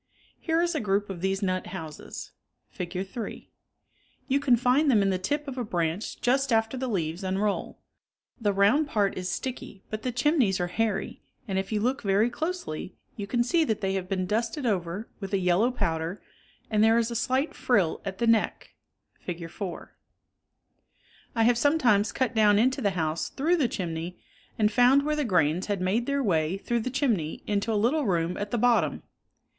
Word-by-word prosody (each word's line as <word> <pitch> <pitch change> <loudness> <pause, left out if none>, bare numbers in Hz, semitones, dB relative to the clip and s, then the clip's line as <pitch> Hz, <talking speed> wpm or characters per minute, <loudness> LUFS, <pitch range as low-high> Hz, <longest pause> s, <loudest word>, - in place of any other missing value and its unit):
Here 330 0 +1
is 345 0 0
a 310 - 0
group 200 -1 0
of 175 -3 -7
these 190 +2 -1
nut 185 -1 -1
houses 160 -5 -8 0.4
(Fig. 180 +2 -4
3). 225 +3 -7 0.8
You 275 +1 +2
can 270 -3 +4
find 250 +5 +3
them 215 -6 +4
in 195 - +2
the 185 - -1
tip 290 +10 -2
of 265 -2 -5
a - - -1
branch 175 -1 -2
just 265 +2 +2
after 225 +2 +2
the 260 0 -3
leaves 175 -4 -2
unroll. 195 +2 -1 0.6
The 210 -3 +1
round 205 +10 +3
part 205 -8 +1
is 185 0 -3
sticky, 245 -6 -5
but 215 0 -3
the 250 - -2
chimneys 250 - +2
are 175 - +1
hairy 225 +4 -2 0.3
and 190 -2 0
if 195 +2 -4
you 210 -1 0
look 255 +5 0
very 205 +3 +2
closely 315 - -4 0.2
you 200 -2 -5
can 240 +3 +1
see 325 +7 +2
that 220 -5 -1
they 195 -1 0
have 190 -1 -3
been 185 -2 0
dusted 230 - -1
over 190 0 -1
with 195 -1 -6
a - - +4
yellow 185 +5 +3
powder, 165 -5 -2 0.5
and 215 0 +3
there 225 +1 +5
is 235 0 +1
a - - -4
slight 260 +5 0
frill 200 -10 +1
at 195 -1 -5
the 235 - 0
neck 230 -2 +1 0.5
(Fig. 170 -2 -6
4). 185 -2 -7 1.4
1 225 -1 +2
have 240 0 +4
sometimes 245 -9 +3
cut 260 -2 -1
down 210 -2 +5
into 260 +5 +2
the 200 -5 0
house 160 0 -1
through 325 +6 +1
the 280 -7 +2
chimney 175 -3 -4 0.4
and 210 -1 +3
found 250 +5 +5
where 300 +1 0
the 300 - 0
grains 175 - +1
had 205 -2 -1
made 195 +6 0
their 280 0 0
way 165 -3 +1
through 235 +4 -1
the 230 - -2
chimney 230 - -1
into 205 +2 0
a - - +1
little 245 +6 +2
room 170 -1 0
at 205 0 -3
the, 240 - -1
bottom. 240 +1 +2
215 Hz, 195 wpm, -27 LUFS, 190-250 Hz, 1.4 s, there